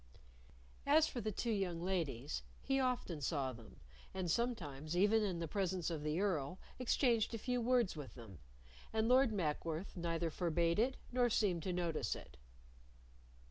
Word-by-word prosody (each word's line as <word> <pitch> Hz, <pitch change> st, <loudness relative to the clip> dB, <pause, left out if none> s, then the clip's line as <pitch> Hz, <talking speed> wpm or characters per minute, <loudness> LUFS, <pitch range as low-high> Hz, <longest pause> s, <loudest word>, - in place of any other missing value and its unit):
As 305 Hz, +2 st, +6 dB
for 245 Hz, -, -4 dB
the 215 Hz, -, -1 dB
two 230 Hz, +4 st, -1 dB
young 190 Hz, -5 st, 0 dB
ladies, 160 Hz, -7 st, -2 dB, 0.2 s
he 270 Hz, 0 st, +1 dB
often 250 Hz, -, -1 dB
saw 140 Hz, -3 st, 0 dB
them, 115 Hz, -2 st, -13 dB, 0.4 s
and 180 Hz, -3 st, -1 dB
sometimes, 170 Hz, -, -1 dB
even 210 Hz, +4 st, +5 dB
in 195 Hz, -5 st, 0 dB
the 165 Hz, -1 st, -3 dB
presence 185 Hz, -1 st, -1 dB
of 160 Hz, -3 st, -3 dB
the 150 Hz, +3 st, -1 dB
Earl, 180 Hz, -5 st, 0 dB, 0.2 s
exchanged 235 Hz, -2 st, +2 dB
a -, -, -2 dB
few 250 Hz, +2 st, -1 dB
words 240 Hz, -5 st, +2 dB
with 145 Hz, -4 st, -8 dB
them, 110 Hz, -8 st, -11 dB, 0.5 s
and 220 Hz, 0 st, +1 dB
Lord 255 Hz, 0 st, +5 dB
Mackworth 165 Hz, -2 st, -2 dB
neither 170 Hz, -1 st, -1 dB
forbade 170 Hz, +1 st, +1 dB
it 255 Hz, +4 st, +2 dB
nor 245 Hz, -1 st, +3 dB
seemed 195 Hz, -6 st, +2 dB
to 185 Hz, -, -2 dB
notice 175 Hz, -3 st, -1 dB
it. 65 Hz, -, -11 dB
180 Hz, 160 wpm, -37 LUFS, 160-225 Hz, 0.5 s, As